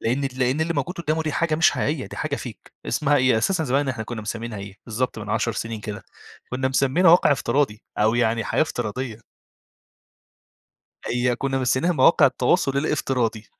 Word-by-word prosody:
لإن 135 Hz, +4 st, 0 dB
لإن 130 Hz, +4 st, +1 dB
اللي 165 Hz, +1 st, 0 dB
موجود 180 Hz, +2 st, -2 dB
قدّامه 160 Hz, -1 st, -1 dB
دي 155 Hz, -2 st, -2 dB
حاجة 165 Hz, 0 st, 0 dB
مش 165 Hz, +3 st, +4 dB
حقيقية، 145 Hz, -2 st, -2 dB
دي -, -, -10 dB
حاجة -, -, -2 dB
fake -, -, -9 dB, 0.2 s
اسمها 145 Hz, -1 st, +2 dB
إيه 130 Hz, -4 st, +3 dB
أساسًا 165 Hz, +6 st, 0 dB
زمان 135 Hz, +1 st, +1 dB
إحنا 115 Hz, -4 st, -3 dB
كنّا 115 Hz, -1 st, -6 dB
مسمينها 115 Hz, 0 st, -5 dB
إيه، 100 Hz, 0 st, -9 dB
بالضبط 115 Hz, +1 st, -2 dB
من 105 Hz, -1 st, -7 dB
10 115 Hz, -, 0 dB
سنين 115 Hz, 0 st, -5 dB
كده، 105 Hz, 0 st, -6 dB, 0.5 s
كنّا 130 Hz, +1 st, -1 dB
مسمينها 135 Hz, +6 st, +3 dB
واقع 165 Hz, -4 st, +6 dB
افتراضي، 135 Hz, -6 st, 0 dB, 0.2 s
أو 110 Hz, +2 st, +3 dB
يعني 115 Hz, -1 st, +1 dB
حياة -, -, +1 dB
افتراضية. 120 Hz, -4 st, -4 dB, 1.9 s
هي 125 Hz, 0 st, 0 dB
كنّا 135 Hz, 0 st, -1 dB
مسمينها 130 Hz, +7 st, +1 dB
مواقع 130 Hz, -5 st, +5 dB
التواصل 135 Hz, 0 st, +1 dB
الافتراضي، 125 Hz, -7 st, -1 dB
130 Hz, 170 wpm, -23 LUFS, 115-145 Hz, 1.9 s, واقع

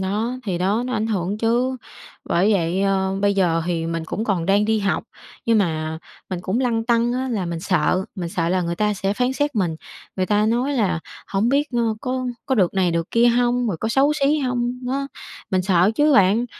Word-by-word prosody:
đó, 215 Hz, +6 st, -1 dB
thì 185 Hz, -5 st, -2 dB
đó 200 Hz, +6 st, +1 dB
nó 255 Hz, -, -3 dB
ảnh 220 Hz, -1 st, 0 dB
hưởng 200 Hz, -1 st, -2 dB
chứ. 240 Hz, +3 st, +1 dB, 0.5 s
Bởi 185 Hz, +5 st, +2 dB
vậy, 180 Hz, 0 st, +1 dB
ờ, 190 Hz, -1 st, +1 dB
bây 200 Hz, 0 st, +2 dB
giờ 170 Hz, -4 st, +2 dB
thì 165 Hz, -2 st, -1 dB
mình 165 Hz, -1 st, -3 dB
cũng 215 Hz, +7 st, -3 dB
còn 185 Hz, -6 st, -1 dB
đang 200 Hz, +2 st, +3 dB
đi 220 Hz, 0 st, +1 dB
học, 200 Hz, +1 st, -1 dB, 0.4 s
nhưng 230 Hz, -1 st, +4 dB
mà 160 Hz, -4 st, -1 dB, 0.3 s
mình 180 Hz, -, -3 dB
cũng 210 Hz, +8 st, -1 dB
lăn 230 Hz, -3 st, 0 dB
tăn 235 Hz, 0 st, +2 dB
á 260 Hz, +1 st, -2 dB
là 210 Hz, -7 st, -2 dB
mình 170 Hz, -1 st, -4 dB
sợ 185 Hz, +1 st, +1 dB
mình 175 Hz, -3 st, -4 dB
sợ 165 Hz, -1 st, -1 dB
là 185 Hz, +1 st, +1 dB
người 170 Hz, 0 st, -2 dB
ta 210 Hz, +2 st, +1 dB
sẽ 195 Hz, +1 st, -1 dB
phán 250 Hz, +3 st, 0 dB
xét 290 Hz, 0 st, -1 dB
mình, 175 Hz, -6 st, 0 dB, 0.4 s
người 185 Hz, -, 0 dB
ta 210 Hz, +1 st, +2 dB
nói 245 Hz, +5 st, +1 dB
là 210 Hz, -, 0 dB, 0.3 s
"Hổng 205 Hz, +4 st, 0 dB
biết, 285 Hz, +3 st, +1 dB
ơ, 230 Hz, -2 st, +1 dB
có 255 Hz, -1 st, -2 dB, 0.2 s
có 265 Hz, -, +1 dB
được 190 Hz, -6 st, +2 dB
này 185 Hz, -2 st, +2 dB
được 165 Hz, 0 st, -2 dB
kia 235 Hz, +1 st, +4 dB
hông, 245 Hz, 0 st, +2 dB
rồi 185 Hz, -, -1 dB
có 220 Hz, -, -1 dB
xấu 275 Hz, +5 st, +3 dB
xí 300 Hz, 0 st, +2 dB
hông?" 250 Hz, -3 st, -1 dB
đó, 275 Hz, +2 st, -1 dB, 0.4 s
mình 185 Hz, -1 st, +1 dB
sợ 185 Hz, +1 st, +3 dB
chứ 295 Hz, +4 st, +3 dB
bạn, 200 Hz, +2 st, +4 dB
210 Hz, 225 wpm, -22 LUFS, 185-240 Hz, 0.5 s, nhưng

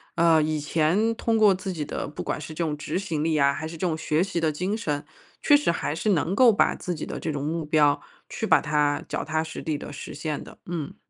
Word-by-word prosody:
呃， 165 Hz, -2 st, +4 dB
以 155 Hz, 0 st, -1 dB
前 165 Hz, +9 st, +1 dB
通 225 Hz, 0 st, 0 dB
过 210 Hz, -3 st, +6 dB
自 190 Hz, +1 st, -5 dB
己 155 Hz, -5 st, -4 dB
的， -, -, -4 dB
不 145 Hz, -, -7 dB
管 -, -, -3 dB
是 155 Hz, +1 st, -7 dB
这 155 Hz, -, -4 dB
种 150 Hz, -2 st, -1 dB
执 155 Hz, +4 st, -3 dB
行 160 Hz, -6 st, -2 dB
力 160 Hz, -1 st, +1 dB
啊， 140 Hz, -1 st, +4 dB
还 155 Hz, -, -5 dB
是 165 Hz, +1 st, -7 dB
这 180 Hz, -, 0 dB
种 160 Hz, -2 st, -1 dB
学 155 Hz, 0 st, 0 dB
习 185 Hz, -2 st, -1 dB
的 160 Hz, -1 st, +2 dB
精 185 Hz, +7 st, -2 dB
神， 150 Hz, -9 st, -3 dB, 0.4 s
确 290 Hz, -, +6 dB
实 290 Hz, -10 st, +3 dB
还 155 Hz, -2 st, -2 dB
是 215 Hz, -, -1 dB
能 180 Hz, -1 st, +1 dB
够 245 Hz, +1 st, +7 dB
把 210 Hz, -, +2 dB
自 180 Hz, -, -4 dB
己 155 Hz, -, -5 dB
的 -, -, -5 dB
这 160 Hz, -, -3 dB
种 145 Hz, -2 st, -3 dB
目 165 Hz, +2 st, -2 dB
标， 150 Hz, -1 st, +3 dB, 0.3 s
去 -, -, -4 dB
把 -, -, +5 dB
它 150 Hz, -1 st, +1 dB
脚 -, -, -3 dB
踏 155 Hz, 0 st, -1 dB
实 160 Hz, 0 st, -6 dB
地 155 Hz, -2 st, -2 dB
地 -, -, -8 dB
实 -, -, -8 dB
现 150 Hz, -1 st, -4 dB
的， -, -, -13 dB
嗯。 165 Hz, -5 st, -5 dB
160 Hz, 280 characters per minute, -25 LUFS, 150-180 Hz, 0.4 s, 够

